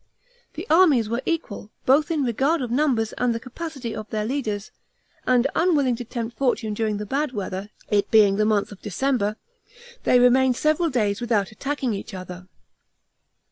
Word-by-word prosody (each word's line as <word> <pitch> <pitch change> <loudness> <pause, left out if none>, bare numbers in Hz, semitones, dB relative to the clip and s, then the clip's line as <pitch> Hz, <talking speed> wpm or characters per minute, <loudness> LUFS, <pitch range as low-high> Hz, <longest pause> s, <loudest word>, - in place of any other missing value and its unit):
The 330 +4 -6
armies 315 - +5
were 235 +2 -1
equal, 305 -11 -3 0.2
both 285 +5 +4
in 315 -4 0
regard 270 +5 +1
of 240 - -4
numbers 245 -5 +1
and 245 -1 +1
the - - -2
capacity 265 -1 -6
of 215 -1 -7
their 215 -1 -2
leaders, 220 -5 -3 0.6
and 250 0 +4
unwilling 295 -8 +2
to 245 - -5
tempt 235 0 -5
fortune 240 -5 0
during 215 -1 -1
the 210 - -5
bad 275 +5 -1
weather, 195 -1 -4 0.2
it 205 -1 +2
being 205 -3 +5
the 215 - +2
month 210 -2 +1
of 200 - -12
December, 215 0 -1 0.7
they 250 - +4
remained 250 +1 +4
several 310 +2 +2
days 210 -6 0
without 220 -5 0
attacking 270 +1 -2
each 195 0 -6
other. 180 0 -9
240 Hz, 170 wpm, -23 LUFS, 210-275 Hz, 0.7 s, armies